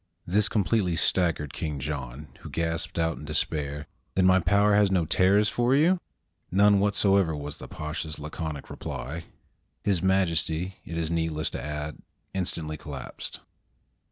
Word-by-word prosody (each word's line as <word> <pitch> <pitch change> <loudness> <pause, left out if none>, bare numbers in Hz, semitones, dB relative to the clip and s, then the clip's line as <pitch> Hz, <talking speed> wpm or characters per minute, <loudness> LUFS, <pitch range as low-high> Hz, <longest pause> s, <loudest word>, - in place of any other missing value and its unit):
This 105 +4 +2
completely 100 -3 +1
staggered 80 -4 +1
King 75 -3 -3
John, 70 0 -5
who - - -9
gasped 80 0 -2
out 80 -1 0
in - - -9
despair, 75 -1 -1 0.3
"Then 95 - +4
my 95 0 +6
power 100 +4 +4
has 100 -1 +5
no 90 -3 +2
terrors 100 +6 +4
for 120 +4 +2
you?" 170 +6 +4 0.5
"None 100 +2 +5
whatever," 100 -4 +3
was 75 0 -6
the - - -9
Pasha's 80 +1 -5
laconic 75 -1 -5
reply. 80 +5 -5 0.6
His 100 -4 +2
Majesty, 90 -1 +1
it 85 - -5
is 85 -1 -1
needless 80 -2 0
to - - -4
add, 75 +1 -4 0.3
instantly 80 -4 -2
collapsed. 70 -3 -7
85 Hz, 145 wpm, -27 LUFS, 75-95 Hz, 0.6 s, my